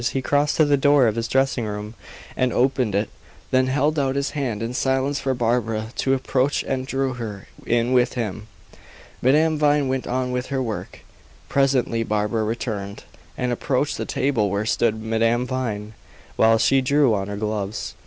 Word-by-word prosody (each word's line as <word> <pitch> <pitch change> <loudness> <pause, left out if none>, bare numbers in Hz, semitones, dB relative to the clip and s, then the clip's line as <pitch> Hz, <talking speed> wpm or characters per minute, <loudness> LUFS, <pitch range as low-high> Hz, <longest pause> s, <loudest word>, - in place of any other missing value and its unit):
He 135 - -1
crossed 145 +4 +1
to 155 - +5
the 145 -1 +3
door 145 -1 +4
of 110 - +2
his 115 0 -2
dressing 135 0 +1
room 105 +1 -5 0.4
and 130 -1 +1
opened 125 -4 +1
it, 105 +2 0 0.4
then 130 0 +3
held 145 +3 +1
out 135 -1 0
his 140 0 -1
hand 120 -7 -3
in 115 +2 -3
silence 135 +2 0
for 135 -1 -1
Barbara 115 -2 0
to 135 0 +2
approach 130 +1 0
and 130 0 -2
drew 135 -1 -1
her 110 -5 -7 0.2
in 120 +2 +1
with 125 -1 +3
him. 110 -3 -4 0.7
Madame 155 +4 +3
Vine 145 -2 +3
went 130 0 -2
on 125 0 -1
with 125 0 -2
her 135 -1 -2
work. 110 -3 -6 0.5
Presently 130 -4 +2
Barbara 110 0 0
returned, 105 -3 -4 0.3
and 125 -1 -1
approached 140 +4 -1
the - - -3
table 120 -7 0
where 100 +3 -1
stood 110 -1 +1
Madame 115 +2 +1
Vine, 110 -5 -3 0.4
while 115 0 +4
she 135 +4 +3
drew 140 -2 +3
on 95 -2 -1
her 100 0 -5
gloves. 105 0 -3
125 Hz, 175 wpm, -22 LUFS, 110-135 Hz, 0.7 s, to